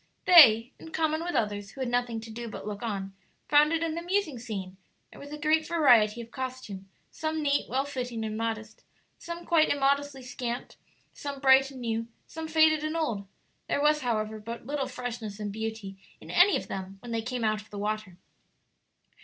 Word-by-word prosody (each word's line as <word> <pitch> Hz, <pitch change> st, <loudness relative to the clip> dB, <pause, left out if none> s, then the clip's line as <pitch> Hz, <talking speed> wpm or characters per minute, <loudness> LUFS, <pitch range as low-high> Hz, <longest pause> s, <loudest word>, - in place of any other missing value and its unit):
They, 250 Hz, -9 st, +8 dB
in 325 Hz, -, -10 dB
common 315 Hz, 0 st, 0 dB
with 350 Hz, 0 st, -3 dB
others 205 Hz, -2 st, -1 dB
who 270 Hz, -, -14 dB
had 260 Hz, -, -1 dB
nothing 240 Hz, -1 st, 0 dB
to 225 Hz, 0 st, -9 dB
do 235 Hz, +1 st, -6 dB
but -, -, -8 dB
look 205 Hz, -1 st, -5 dB
on, 195 Hz, -4 st, -4 dB, 0.3 s
found 300 Hz, +1 st, +5 dB
it 330 Hz, 0 st, +1 dB
an 330 Hz, 0 st, -2 dB
amusing 345 Hz, -6 st, -1 dB
scene; 195 Hz, -5 st, -6 dB, 0.3 s
there -, -, -13 dB
was 285 Hz, +1 st, -10 dB
a 300 Hz, -, -5 dB
great 310 Hz, +1 st, +2 dB
variety 240 Hz, -9 st, +4 dB
of 230 Hz, 0 st, -11 dB
costume, 255 Hz, -7 st, -6 dB, 0.2 s
some 315 Hz, 0 st, -3 dB
neat, 285 Hz, 0 st, +1 dB
well 265 Hz, +2 st, 0 dB
fitting, 245 Hz, -5 st, -4 dB
and 215 Hz, 0 st, -4 dB
modest; 220 Hz, -1 st, -4 dB, 0.4 s
some 340 Hz, 0 st, -7 dB
quite 325 Hz, -2 st, +4 dB
immodestly 280 Hz, -1 st, +1 dB
scant; 245 Hz, -1 st, -5 dB, 0.4 s
some 280 Hz, -1 st, -6 dB
bright 270 Hz, 0 st, +6 dB
and 265 Hz, -2 st, -10 dB
new; 230 Hz, -1 st, -2 dB, 0.2 s
some 320 Hz, 0 st, -7 dB
faded 315 Hz, -1 st, +4 dB
and 310 Hz, +2 st, -2 dB
old. 225 Hz, -11 st, -2 dB, 0.4 s
There -, -, 0 dB
was, 300 Hz, +1 st, +3 dB
however, 220 Hz, -3 st, -1 dB
but 230 Hz, +2 st, -7 dB
little 280 Hz, 0 st, -2 dB
freshness 225 Hz, -4 st, -6 dB
and 205 Hz, -1 st, -3 dB
beauty 220 Hz, -2 st, -5 dB, 0.2 s
in -, -, -10 dB
any 365 Hz, +3 st, +5 dB
of -, -, -7 dB
them 190 Hz, 0 st, -6 dB
when 240 Hz, -, -7 dB
they 230 Hz, -1 st, -1 dB
came 245 Hz, +1 st, -4 dB
out 215 Hz, -1 st, +1 dB
of 210 Hz, -, -19 dB
the 205 Hz, -, -8 dB
water. 210 Hz, -3 st, -3 dB
245 Hz, 195 wpm, -28 LUFS, 220-300 Hz, 0.4 s, They